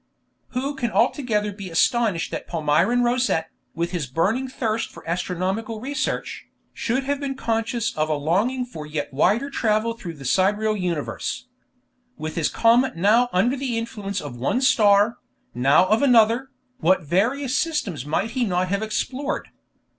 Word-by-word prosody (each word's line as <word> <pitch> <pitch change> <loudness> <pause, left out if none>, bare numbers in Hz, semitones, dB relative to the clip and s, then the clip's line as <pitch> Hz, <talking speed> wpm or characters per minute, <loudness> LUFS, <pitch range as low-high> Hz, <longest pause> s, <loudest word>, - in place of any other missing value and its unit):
Who 270 +3 -1
can 260 -4 -2
altogether 220 -4 +1
be 195 -2 -8
astonished 200 +1 +1
that - - -5
Palmyrin 170 +9 +2
Rosette, 240 -10 +1 0.2
with 170 +1 -2
his 170 -7 -2
burning 200 - 0
thirst 230 -4 -2
for - - -14
astronomical 185 +6 -2
research, 275 +5 -3 0.3
should 255 +3 -1
have 280 +1 -1
been 275 -1 -3
conscious 230 -1 -1
of 155 0 0
a 155 - +1
longing 200 - 0
for 155 -11 -9
yet 150 -2 -4
wider 230 - +2
travel 220 -2 +1
through 175 -8 -8
the 140 -2 -11
sidereal 210 +7 +2
universe? 180 - -3 0.7
With 155 -4 -5
his 165 -3 +1
comet 240 +3 +3
now 215 +8 +3
under 230 +9 +2
the 260 -4 -2
influence 205 -4 -4
of 145 -4 -7
one 135 - 0
star, 210 -3 +4 0.4
now 135 +8 +4
of 215 +4 +2
another, 245 -1 +4 0.3
what 180 +2 +3
various 240 - 0
systems 215 - -1
might 165 +10 -1
he 255 0 0
not 185 -3 0
have 200 +2 0
explored! 255 +6 -3
215 Hz, 155 wpm, -23 LUFS, 175-245 Hz, 0.7 s, star